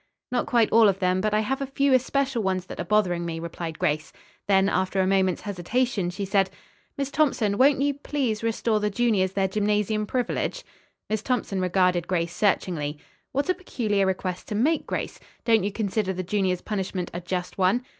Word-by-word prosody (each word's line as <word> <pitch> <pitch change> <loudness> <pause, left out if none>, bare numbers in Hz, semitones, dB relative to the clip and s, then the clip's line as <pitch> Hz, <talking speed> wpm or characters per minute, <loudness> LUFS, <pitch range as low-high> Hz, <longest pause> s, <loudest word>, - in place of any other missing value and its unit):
"Not 250 - 0
quite 235 -3 +3
all 225 -1 +7
of 195 - 0
them, 185 -1 +1
but 215 +1 0
I 210 +1 +2
have 265 +5 -2
a 275 - -2
few 275 0 +2
especial 265 -1 +1
ones 190 -2 -1
that - - -9
are - - -1
bothering 180 -3 +1
me," 165 -1 -4
replied 165 -1 -5
Grace. 155 -4 -1 0.4
Then 195 -1 +4
after 190 0 0
a 190 - +3
moment's 190 -1 +2
hesitation 205 +1 -1
she 195 +3 -4
said, 195 -1 +2 0.5
"Miss 275 -1 -2
Thompson, 270 -9 +2
won't 275 +1 +5
you, 285 0 +2
please, 270 -6 -2
restore 225 -1 0
the 210 0 0
juniors 200 -4 +1
their 195 -1 +1
gymnasium 210 +1 0
privilege?" 250 0 -2 0.4
Miss 215 -1 -1
Thompson 220 -6 -1
regarded 180 -1 +2
Grace 170 -1 -1
searchingly. 165 -7 0 0.3
"What 280 +4 0
a 370 - +3
peculiar 215 - -1
request 185 -1 -3
to 210 - -3
make, 295 +9 +1
Grace. - - -4 0.3
Don't 225 -4 +4
you 205 - -1
consider 205 -2 -1
the 185 0 -4
juniors' 185 -1 0
punishment 190 -3 -3
a 175 - -4
just 180 +1 -4
one?" 195 +7 +2
200 Hz, 190 wpm, -25 LUFS, 185-235 Hz, 0.5 s, all